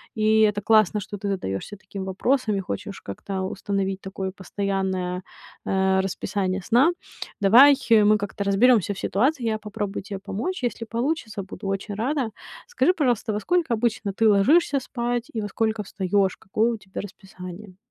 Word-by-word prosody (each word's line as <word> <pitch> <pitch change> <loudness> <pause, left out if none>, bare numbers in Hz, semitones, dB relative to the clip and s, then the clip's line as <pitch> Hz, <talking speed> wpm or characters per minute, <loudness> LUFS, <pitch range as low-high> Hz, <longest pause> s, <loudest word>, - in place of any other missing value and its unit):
И 220 0 +3
это 210 -1 +3
классно, 215 -1 +3
что 205 - -7
ты 200 - -5
задаёшься 185 - -3
таким 195 -1 -8
вопросом 215 +4 0
и 195 - -1
хочешь 195 +1 -6
как-то 190 - -5
установить 195 0 -2
такое 190 0 -5
постоянное, 190 -2 -2 0.4
э, 190 0 +2
расписание 190 0 -2
сна. 245 - +4 0.5
Давай 250 +9 +8 0.2
мы 215 -1 +6
как-то 200 0 -4
разберёмся 205 0 +4
в - - -9
ситуации. 260 +6 +1
Я 220 -1 0
попробую 210 -1 -4
тебе 200 -1 -6
помочь. 245 - -4
Если 235 -1 -2
получится, 230 -3 -2
буду 195 +1 -8
очень 195 +1 -3
рада. 255 +2 -1 0.4
Скажи, 485 -7 +2
пожалуйста, 245 - 0
во 210 - -1
сколько 340 - +1
обычно 220 -3 -1
ты 220 +1 +3
ложишься 275 - +4
спать 240 -2 -3
и 225 - -2
во 205 - -4
сколько 220 0 -1
встаёшь? 195 0 0
Какое 220 +4 0
у 230 - -3
тебя 195 -2 -7
расписание? 190 -1 -10
205 Hz, 160 wpm, -24 LUFS, 195-230 Hz, 0.5 s, Давай